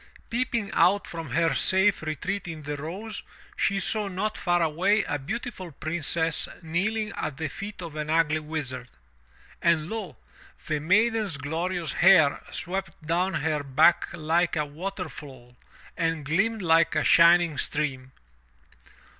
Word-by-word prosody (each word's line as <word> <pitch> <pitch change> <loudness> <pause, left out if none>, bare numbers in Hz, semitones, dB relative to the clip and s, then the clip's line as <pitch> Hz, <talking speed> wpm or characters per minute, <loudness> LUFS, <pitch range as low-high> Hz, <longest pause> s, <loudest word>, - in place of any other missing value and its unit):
Peeping 235 -3 -1
out 185 +4 +3
from 165 -4 -7
her 165 +4 +2
safe 190 +7 +3
retreat 180 +5 -3
in 160 -3 -7
the 145 +1 -4
rose, 190 +9 -6 0.3
she 200 0 +1
saw 210 +1 0
not 200 +3 -2
far 175 -1 +1
away 190 +7 +2
a 145 -3 -3
beautiful 190 - -5
Princess 160 +1 -2 0.2
kneeling 210 +7 -1
at 150 -3 -4
the 160 0 -2
feet 200 +6 -7
of 165 -3 -8
an 150 0 -4
ugly 155 -1 +2
Wizard. 145 -5 -4 0.7
And 170 0 +2
lo! 215 -8 -5 0.5
the 155 -2 -1
maiden's 210 +2 +2
glorious 165 +3 -2
hair 175 -6 +5
swept 190 +2 -4
down 180 +3 0
her 150 -1 0
back 145 +5 +3
like 170 +1 0
a 150 -1 0
water 180 +5 -5
fall 130 -5 -12 0.4
and 165 -3 -1
gleamed 195 +8 0
like 165 -1 +4
a 155 - +2
shining 170 -2 +5
stream. 135 -4 -2
165 Hz, 140 wpm, -26 LUFS, 150-195 Hz, 0.7 s, hair